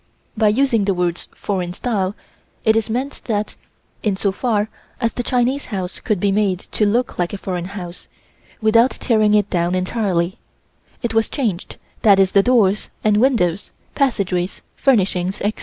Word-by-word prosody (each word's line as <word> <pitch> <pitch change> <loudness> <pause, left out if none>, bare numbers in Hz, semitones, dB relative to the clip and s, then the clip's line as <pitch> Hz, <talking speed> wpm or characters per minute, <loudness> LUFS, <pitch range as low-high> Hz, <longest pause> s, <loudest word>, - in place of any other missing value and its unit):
By 220 -1 +3
using 230 -1 +2
the 195 -1 +1
words 175 -1 -1
"foreign 180 -3 -3
style," 200 -3 -1 0.5
it 220 0 +5
is 225 -1 0
meant 260 +5 -3
that, 215 -2 -2 0.5
in 205 -3 0
so 200 0 +1
far 210 0 0 0.3
as 230 -2 0
the - - -2
Chinese 250 +3 0
house 190 -4 -4
could 210 -5 -1
be 200 +1 +2
made 200 -2 +2
to 210 - +2
look 235 +1 0
like 175 +1 0
a - - -3
foreign 180 -3 -4
house, 175 -2 -8 0.5
without 230 +3 +5
tearing 215 -5 +2
it 205 -1 +2
down 175 0 +1
entirely, 185 -2 -1 0.6
it 235 - -1
was 225 0 +2
changed, 220 - -2 0.3
that 200 -3 +6
is 190 -1 +4
the 200 - +5
doors 210 -3 +2
and 210 -1 +3
windows, 210 -7 +1 0.2
passageways, 195 -9 0
furnishings, 195 -7 +1
etc. 210 +1 -1
205 Hz, 165 wpm, -20 LUFS, 185-230 Hz, 0.6 s, that